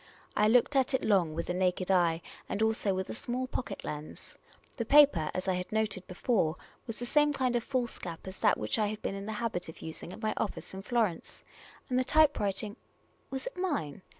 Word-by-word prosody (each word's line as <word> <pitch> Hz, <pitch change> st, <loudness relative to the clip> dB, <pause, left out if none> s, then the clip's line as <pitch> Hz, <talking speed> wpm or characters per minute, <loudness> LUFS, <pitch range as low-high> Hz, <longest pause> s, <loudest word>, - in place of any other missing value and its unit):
I 210 Hz, -, +4 dB
looked 245 Hz, +5 st, +4 dB
at 265 Hz, 0 st, +3 dB
it -, -, -1 dB
long 180 Hz, -7 st, +3 dB
with 170 Hz, -, -2 dB
the 180 Hz, -, -2 dB
naked 185 Hz, 0 st, +1 dB
eye 170 Hz, -3 st, +3 dB, 0.3 s
and 215 Hz, -, 0 dB
also 220 Hz, -2 st, +2 dB
with 190 Hz, 0 st, -2 dB
a -, -, -4 dB
small 245 Hz, +2 st, -3 dB
pocket 255 Hz, 0 st, -5 dB
lens. 150 Hz, +1 st, -7 dB, 0.4 s
The 235 Hz, -, 0 dB
paper, 275 Hz, -, +6 dB
as 185 Hz, +1 st, -2 dB
I 190 Hz, -, +3 dB
had 180 Hz, 0 st, -4 dB
noted 215 Hz, -4 st, 0 dB
before, 185 Hz, -3 st, +1 dB, 0.3 s
was 230 Hz, -, -5 dB
the 245 Hz, -, -4 dB
same 295 Hz, +3 st, +3 dB
kind 255 Hz, -3 st, +1 dB
of 235 Hz, -, +1 dB
foolscap 240 Hz, -11 st, -3 dB
as 190 Hz, 0 st, -8 dB
that -, -, +4 dB
which 105 Hz, -, -1 dB
I 210 Hz, -, +3 dB
had 215 Hz, +1 st, -5 dB
been -, -, -1 dB
in 195 Hz, +1 st, -6 dB
the 220 Hz, -, -3 dB
habit 210 Hz, -6 st, -3 dB
of 160 Hz, -, -11 dB
using 160 Hz, +2 st, -6 dB
at 220 Hz, -, -10 dB
my 215 Hz, -, +1 dB
office 205 Hz, -, -3 dB
in 190 Hz, -, -6 dB
Florence; 215 Hz, -5 st, -1 dB, 0.4 s
and 255 Hz, -1 st, +1 dB
the -, -, +3 dB
typewriting 220 Hz, -8 st, +2 dB, 0.3 s
— -, -, -38 dB
was 265 Hz, -1 st, -4 dB
it -, -, -5 dB
mine 295 Hz, -, -2 dB
210 Hz, 220 wpm, -31 LUFS, 180-250 Hz, 0.4 s, paper